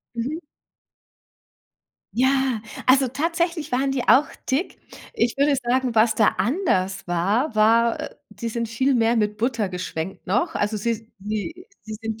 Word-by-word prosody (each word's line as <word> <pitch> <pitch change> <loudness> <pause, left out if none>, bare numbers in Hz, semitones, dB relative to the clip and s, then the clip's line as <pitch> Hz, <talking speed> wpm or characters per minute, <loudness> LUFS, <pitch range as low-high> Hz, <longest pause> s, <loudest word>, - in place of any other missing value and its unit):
Mhm. 255 +7 -3 1.8
Ja, 260 -2 +2 0.2
also, 260 0 +5
tatsächlich 330 +3 -1
waren 270 +2 +1
die 270 -2 -1
auch 285 +3 +5 0.2
dick. 280 +8 -1 0.4
Ich 260 - 0
würde 280 0 +3
sagen, 250 -1 0
was 220 0 +4
da 215 -1 +4
anders 200 - 0
war, 205 - 0
war, 230 +2 +4
äh - - -7
die 235 - -5
sind 230 0 -3
viel 260 +5 +1
mehr 230 -1 +3
mit 210 -1 0
Butter 230 -3 0
geschwenkt 180 -1 -5
noch. 320 - 0
Also, 210 +1 0
sie 225 +1 -3
sie 215 - -5 0.2
sie 220 - -7
sind 225 -1 -5
235 Hz, 150 wpm, -23 LUFS, 215-270 Hz, 1.8 s, also